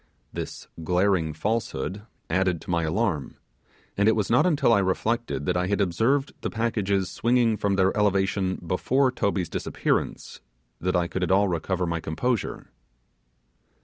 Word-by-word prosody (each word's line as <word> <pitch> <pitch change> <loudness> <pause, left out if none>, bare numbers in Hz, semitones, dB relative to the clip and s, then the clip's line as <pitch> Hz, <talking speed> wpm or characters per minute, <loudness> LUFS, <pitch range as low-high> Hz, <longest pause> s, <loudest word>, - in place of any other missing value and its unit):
This - - -6 0.2
glaring 90 -1 +2
falsehood 105 +2 -2 0.3
added 90 0 +1
to - - -6
my 85 -1 +2
alarm, 80 -3 -1 0.6
and 100 +2 +3
it 110 - +3
was 105 -2 -1
not 125 +9 +5
until 145 -8 +3
I 100 - +5
reflected 105 -1 -1
that 90 - 0
I 90 0 +1
had 100 +1 0
observed 115 - +1
the - - -2
packages 100 -4 0
swinging 120 -1 +2
from 100 -1 0
their 95 0 +2
elevation 95 -2 +1
before 130 +10 +2
Toby's 100 -7 -1
disappearance, - - -2 0.4
that 90 +3 -1
I 85 -1 +2
could 95 - -4
at 90 - 0
all 100 +2 +4
recover 90 +2 -1
my 85 -1 -1
composure. 110 +10 -2
100 Hz, 150 wpm, -25 LUFS, 90-115 Hz, 0.6 s, not